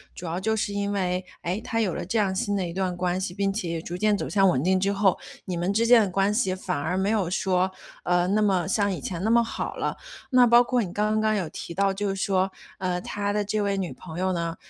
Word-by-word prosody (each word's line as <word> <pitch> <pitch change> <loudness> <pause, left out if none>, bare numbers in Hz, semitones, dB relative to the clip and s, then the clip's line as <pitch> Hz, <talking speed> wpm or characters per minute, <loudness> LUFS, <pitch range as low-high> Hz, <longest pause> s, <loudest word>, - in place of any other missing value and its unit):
主 180 - -8
要 170 +2 -2
就 220 +3 0
是 205 -1 -2
因 200 0 -1
为， 185 -1 -1 0.2
诶， 180 +5 -2
他 230 -1 -2
有 190 -6 0
了 - - -3
这 205 +6 -1
样 195 -2 +1
新 205 0 -1
的 190 -3 -1
一 170 - -6
段 185 -1 -1
关 180 +1 -1
系， 180 - -3
并 195 -1 0
且 190 -4 -3
也 165 0 -2
逐 175 - -6
渐 210 +1 +2
走 - - -3
向 195 -2 +4
稳 130 -4 +1
定 185 +2 +3
之 195 +1 +1
后， 195 -2 +2 0.3
你 185 - -3
们 175 +3 0
之 225 +3 +2
间 240 -1 +7
的 200 - -1
关 195 +2 +1
系 210 -4 +1
反 185 -1 -3
而 160 +6 -1
没 190 +1 +1
有 205 -6 +1
说， 185 0 +1 0.3
呃， 175 0 +2
那 210 +2 +2
么 190 -4 +2
像 200 +1 +1
以 165 - -4
前 175 +5 -4
那 220 - +1
么 235 0 +5
好 230 - -4
了。 - - -2 0.3
那 250 -1 +6
包 240 +1 +7
括 245 0 +1
你 180 - -6
刚 215 +1 +1
刚 215 0 +2
有 190 -5 -1
提 170 - -7
到， 195 0 +2
就 195 0 -2
是 195 - -2
说， 190 -1 +1 0.3
呃， 180 -2 -1
他 205 +2 -2
的 210 0 0
这 210 +1 -1
位 200 -1 0
女 185 -3 -3
朋 160 -2 -10
友 185 0 +1
呢， 170 -1 -2
195 Hz, 295 characters per minute, -25 LUFS, 180-210 Hz, 0.3 s, 间